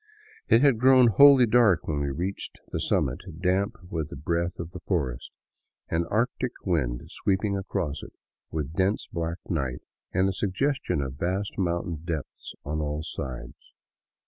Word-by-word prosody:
It 115 Hz, -, +5 dB
had 135 Hz, -6 st, +4 dB
grown 130 Hz, -1 st, +7 dB
wholly 135 Hz, +3 st, +8 dB
dark 110 Hz, -6 st, +4 dB
when 75 Hz, -2 st, -1 dB
we 70 Hz, -1 st, -1 dB
reached 90 Hz, +8 st, -4 dB
the -, -, -2 dB
summit, -, -, 0 dB, 0.2 s
damp 95 Hz, +2 st, +1 dB, 0.2 s
with 80 Hz, -3 st, -2 dB
the -, -, -7 dB
breath 85 Hz, +4 st, -1 dB
of 85 Hz, 0 st, -6 dB
the -, -, -8 dB
forest, 70 Hz, -10 st, -2 dB, 0.6 s
an 85 Hz, +1 st, 0 dB
Arctic 120 Hz, +3 st, 0 dB
wind 65 Hz, -10 st, 0 dB
sweeping 100 Hz, 0 st, -1 dB
across 75 Hz, -6 st, -3 dB
it, -, -, -11 dB, 0.4 s
with 75 Hz, -1 st, -4 dB
dense 95 Hz, +5 st, 0 dB
black 85 Hz, 0 st, -2 dB
night 70 Hz, -7 st, -2 dB, 0.3 s
and 95 Hz, +1 st, +2 dB
a 95 Hz, -, 0 dB
suggestion 100 Hz, -, 0 dB
of 65 Hz, +1 st, -6 dB
vast 95 Hz, +4 st, -1 dB
mountain 85 Hz, -2 st, -1 dB
depths 80 Hz, -4 st, -5 dB
on 75 Hz, +2 st, -2 dB
all 75 Hz, +1 st, -2 dB
sides. 65 Hz, -5 st, -7 dB
85 Hz, 155 wpm, -27 LUFS, 75-100 Hz, 0.6 s, wholly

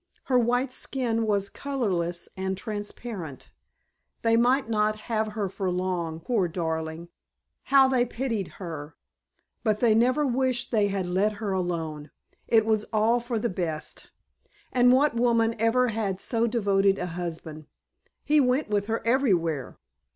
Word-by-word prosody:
Her 255 Hz, -2 st, +3 dB
white 245 Hz, +2 st, +1 dB
skin 230 Hz, -4 st, -1 dB
was 200 Hz, -2 st, +1 dB
colorless 185 Hz, -12 st, -2 dB
and 190 Hz, 0 st, -2 dB
transparent. 205 Hz, -, -6 dB, 0.7 s
They 230 Hz, 0 st, +4 dB
might 250 Hz, +2 st, +3 dB
not 215 Hz, -1 st, 0 dB
have 220 Hz, -1 st, -2 dB
her 210 Hz, -2 st, -1 dB
for 190 Hz, 0 st, -3 dB
long, 180 Hz, -3 st, -2 dB
poor 210 Hz, -2 st, 0 dB
darling! 160 Hz, 0 st, -4 dB, 0.6 s
How 270 Hz, -1 st, +6 dB
they 260 Hz, -2 st, +3 dB
pitied 230 Hz, -5 st, -3 dB
her! 160 Hz, -4 st, -7 dB, 0.7 s
But 215 Hz, -3 st, +1 dB
they 235 Hz, -3 st, +4 dB
never 255 Hz, +6 st, +3 dB
wished 255 Hz, -1 st, 0 dB
they 210 Hz, -3 st, +3 dB
had 195 Hz, -2 st, -2 dB
let 190 Hz, +4 st, +1 dB
her 205 Hz, -1 st, -4 dB
alone. 165 Hz, -5 st, -3 dB, 0.4 s
It 220 Hz, -2 st, +4 dB
was 215 Hz, -1 st, +1 dB
all 220 Hz, +2 st, +2 dB
for 240 Hz, 0 st, -3 dB
the 220 Hz, -, 0 dB
best. 170 Hz, -6 st, -4 dB, 0.6 s
And 245 Hz, 0 st, +5 dB
what 275 Hz, +2 st, +4 dB
woman 230 Hz, -1 st, +2 dB
ever 240 Hz, +3 st, +3 dB
had 205 Hz, -4 st, -2 dB
so 230 Hz, +1 st, 0 dB
devoted 200 Hz, -4 st, +2 dB
a 180 Hz, -, -2 dB
husband? 165 Hz, -3 st, -6 dB, 0.6 s
He 300 Hz, +1 st, +4 dB
went 260 Hz, 0 st, +2 dB
with 205 Hz, -1 st, 0 dB
her 225 Hz, 0 st, -2 dB
everywhere. 180 Hz, -, +1 dB
215 Hz, 145 wpm, -26 LUFS, 180-240 Hz, 0.7 s, How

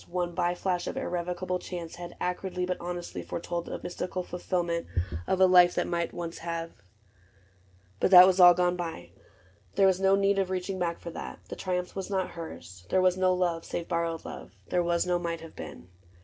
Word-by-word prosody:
One 175 Hz, 0 st, -2 dB
by 175 Hz, 0 st, 0 dB
flash 180 Hz, -1 st, -1 dB
of -, -, -4 dB
irrevocable 180 Hz, +1 st, -2 dB
chance, 175 Hz, -3 st, -7 dB
Had 175 Hz, 0 st, -8 dB
acridly 180 Hz, 0 st, -2 dB
but 180 Hz, 0 st, -2 dB
honestly 175 Hz, 0 st, -5 dB
foretold 170 Hz, 0 st, -4 dB
The -, -, -5 dB
mystical 180 Hz, +1 st, -4 dB
fulfillment 175 Hz, -1 st, -2 dB, 0.4 s
of 190 Hz, -, +1 dB
a 190 Hz, -, +8 dB
life 180 Hz, -1 st, +6 dB
That -, -, +1 dB
might 170 Hz, -1 st, -1 dB
have -, -, -21 dB
once... 170 Hz, -1 st, -5 dB, 1.6 s
But -, -, +3 dB
that 180 Hz, -1 st, +11 dB
was 190 Hz, 0 st, +3 dB
all 175 Hz, -1 st, +9 dB
gone 180 Hz, 0 st, +2 dB
by: 170 Hz, -, -6 dB, 0.6 s
There 195 Hz, -, +5 dB
was 190 Hz, -1 st, +4 dB
no 195 Hz, 0 st, +4 dB
need 195 Hz, 0 st, +2 dB
of 190 Hz, -1 st, 0 dB
reaching 185 Hz, +1 st, -3 dB
back 170 Hz, -1 st, -1 dB
for 170 Hz, -, -7 dB
that: -, -, -7 dB
The -, -, -5 dB
triumph 180 Hz, -1 st, -3 dB
was 195 Hz, 0 st, -4 dB
not 190 Hz, -2 st, -1 dB
hers: 95 Hz, -, -9 dB
there -, -, +3 dB
was 185 Hz, -1 st, +4 dB
no 185 Hz, 0 st, +3 dB
love 175 Hz, -2 st, 0 dB
Save 170 Hz, -, -4 dB
borrowed 165 Hz, -1 st, -1 dB
love: -, -, -9 dB
there 180 Hz, -, +2 dB
was 170 Hz, 0 st, +1 dB
no 180 Hz, -1 st, +1 dB
might 170 Hz, -1 st, -3 dB
have 165 Hz, -1 st, -11 dB
been. 85 Hz, -, -9 dB
180 Hz, 200 wpm, -28 LUFS, 170-185 Hz, 1.6 s, that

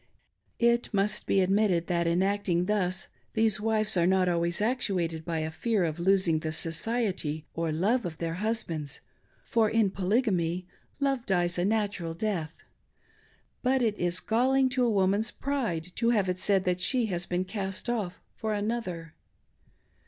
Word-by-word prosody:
It 235 Hz, 0 st, +2 dB
must 205 Hz, 0 st, 0 dB
be 195 Hz, -, +3 dB
admit 200 Hz, +3 st, +3 dB
ted 170 Hz, -2 st, +1 dB
.that, 170 Hz, -1 st, 0 dB
in 170 Hz, +2 st, +2 dB
acting 195 Hz, -3 st, +1 dB
thus, 190 Hz, -2 st, 0 dB, 0.3 s
these 220 Hz, -2 st, +2 dB
wives 215 Hz, -1 st, +2 dB
are 175 Hz, -1 st, +3 dB
not 190 Hz, -1 st, +3 dB
always 170 Hz, 0 st, 0 dB
actuated 190 Hz, -8 st, 0 dB
by 165 Hz, 0 st, -3 dB
a 155 Hz, 0 st, -3 dB
fear 210 Hz, +4 st, 0 dB
of 160 Hz, 0 st, -2 dB
losing 185 Hz, -3 st, +3 dB
the 155 Hz, 0 st, -3 dB
society 165 Hz, -2 st, -1 dB
or 165 Hz, -1 st, -1 dB
love' 205 Hz, +11 st, +1 dB
of 170 Hz, -4 st, -5 dB
their 165 Hz, 0 st, -3 dB
husbands, 175 Hz, -7 st, -3 dB, 0.4 s
for, 225 Hz, -2 st, +2 dB
in 220 Hz, -3 st, +2 dB
Polygamy, 185 Hz, -4 st, 0 dB, 0.3 s
love 275 Hz, -3 st, 0 dB
dies 175 Hz, -2 st, +1 dB
a 175 Hz, -, +1 dB
natural 200 Hz, -6 st, -1 dB
death; 170 Hz, -5 st, -3 dB, 1.0 s
but 260 Hz, 0 st, +2 dB
it 215 Hz, -3 st, 0 dB
is 175 Hz, 0 st, 0 dB
galling 260 Hz, +4 st, +2 dB
to 255 Hz, 0 st, +1 dB
a 240 Hz, -, +3 dB
woman's 200 Hz, +2 st, +2 dB
pride 230 Hz, -, -2 dB
to 230 Hz, -1 st, +2 dB
have 210 Hz, -5 st, +2 dB
it 180 Hz, 0 st, -2 dB
said 195 Hz, -1 st, +2 dB
that 180 Hz, 0 st, 0 dB
she 250 Hz, +4 st, +3 dB
has 175 Hz, -4 st, -2 dB
been 180 Hz, +1 st, -1 dB
cast 195 Hz, +1 st, -4 dB
off 215 Hz, -7 st, -3 dB
for 220 Hz, -1 st, -3 dB
another. 205 Hz, -7 st, -3 dB
195 Hz, 165 wpm, -28 LUFS, 175-220 Hz, 1.0 s, be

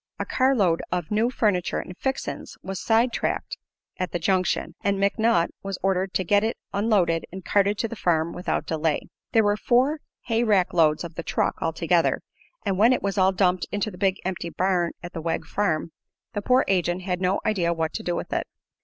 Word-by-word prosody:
A -, -, -3 dB
carload 225 Hz, -11 st, +2 dB
of 175 Hz, -1 st, -2 dB
new 220 Hz, +3 st, +2 dB
furniture 205 Hz, -8 st, 0 dB
and 180 Hz, -, -6 dB
"fixin's" 265 Hz, +6 st, -4 dB
was 190 Hz, -1 st, -4 dB
sidetracked 235 Hz, -, 0 dB, 0.4 s
at 185 Hz, -, -2 dB
the -, -, -1 dB
junction, 185 Hz, +1 st, 0 dB
and 200 Hz, 0 st, +1 dB
McNutt 200 Hz, -2 st, +2 dB
was 195 Hz, -1 st, -4 dB
ordered 190 Hz, 0 st, +1 dB
to 185 Hz, -, +2 dB
get 205 Hz, +4 st, +3 dB
it 225 Hz, +2 st, -1 dB, 0.2 s
unloaded 200 Hz, -6 st, +2 dB
and 190 Hz, 0 st, -8 dB
carted 200 Hz, 0 st, +2 dB
to 230 Hz, -, 0 dB
the 230 Hz, -, -7 dB
farm 170 Hz, -4 st, +1 dB
without 180 Hz, -, -2 dB
delay. 160 Hz, -1 st, 0 dB, 0.3 s
There 225 Hz, -, +5 dB
were 205 Hz, 0 st, +3 dB
four 255 Hz, +8 st, +2 dB, 0.2 s
hay 230 Hz, 0 st, +1 dB
rack 200 Hz, -5 st, +2 dB
loads 155 Hz, -2 st, +3 dB
of 170 Hz, -1 st, -7 dB
the -, -, -5 dB
"truck," -, -, -1 dB
altogether, -, -, +1 dB, 0.4 s
and 195 Hz, -1 st, 0 dB
when 230 Hz, +4 st, +6 dB
it -, -, -1 dB
was 200 Hz, 0 st, -1 dB
all 190 Hz, 0 st, +5 dB
dumped 185 Hz, -1 st, +1 dB
into 205 Hz, +1 st, -1 dB
the 180 Hz, -, -11 dB
big 190 Hz, -1 st, +2 dB
empty 180 Hz, -2 st, -3 dB
barn 180 Hz, -1 st, 0 dB
at 175 Hz, -, -7 dB
the 165 Hz, -, -5 dB
Wegg 165 Hz, 0 st, -2 dB
farm 170 Hz, -5 st, -1 dB, 0.4 s
the 205 Hz, -, -2 dB
poor 255 Hz, +5 st, +3 dB
agent 180 Hz, -1 st, +1 dB
had 180 Hz, -1 st, -2 dB
no 185 Hz, +2 st, +2 dB
idea 180 Hz, -6 st, +1 dB
what 160 Hz, -1 st, -1 dB
to -, -, -3 dB
do 175 Hz, -, -2 dB
with -, -, -4 dB
it. -, -, -1 dB
190 Hz, 200 wpm, -25 LUFS, 175-210 Hz, 0.4 s, when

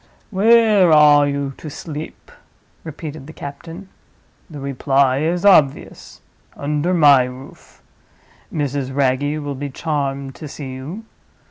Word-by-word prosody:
"Where 215 Hz, -3 st, +4 dB
are 150 Hz, -1 st, +6 dB
you 140 Hz, -1 st, -3 dB
to 155 Hz, -, -8 dB
sleep?" 155 Hz, +1 st, -9 dB, 0.5 s
repeated 155 Hz, -2 st, -8 dB
the 160 Hz, -, -11 dB
captain. 165 Hz, +7 st, -9 dB, 0.6 s
"The 150 Hz, -3 st, -9 dB
reply 135 Hz, -1 st, +1 dB
is 170 Hz, +5 st, -1 dB
obvious—under 150 Hz, -1 st, 0 dB
my 145 Hz, -6 st, +6 dB
roof. 125 Hz, +1 st, -13 dB, 0.7 s
Mrs. 140 Hz, -3 st, -3 dB
Wragge 140 Hz, +2 st, 0 dB
will 145 Hz, -2 st, -5 dB
be 140 Hz, +1 st, -5 dB
charmed 140 Hz, -2 st, -3 dB
to 155 Hz, -, -9 dB
see 135 Hz, -2 st, -8 dB
you. 155 Hz, +13 st, -8 dB
145 Hz, 115 wpm, -19 LUFS, 140-160 Hz, 0.7 s, are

